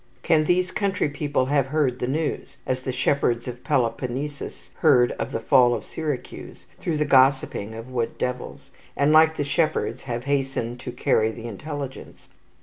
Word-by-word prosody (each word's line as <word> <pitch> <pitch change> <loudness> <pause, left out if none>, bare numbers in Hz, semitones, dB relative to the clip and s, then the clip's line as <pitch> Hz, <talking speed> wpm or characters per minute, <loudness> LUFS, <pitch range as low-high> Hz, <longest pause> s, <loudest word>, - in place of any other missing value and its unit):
Can 155 -2 +3
these 180 +2 +2
country 195 -5 0
people 145 -2 -1
have 140 -1 +1
heard 135 -3 0
the 125 - -1
news, 150 0 -2
as 130 0 -1
the 130 - -3
shepherds 125 -2 +1
of 125 0 -7
Peloponnesus 130 +2 -2
heard 120 -1 +5
of - - -3
the - - -2
fall 120 0 +4
of - - -6
Syracuse, 150 -5 -6
through 165 -3 -1
the 150 - +1
gossiping 130 -6 +3
of 115 +3 -9
wood 120 -2 -2
devils, 125 0 -4 0.3
and, 140 +1 +3
like 160 0 +6
the - - 0
shepherds, 155 +3 0
have 120 0 -2
hastened 135 -4 -1
to 125 - -6
carry 110 -2 +2
the 115 +1 -8
intelligence? 140 +4 -7
135 Hz, 165 wpm, -24 LUFS, 125-150 Hz, 0.3 s, like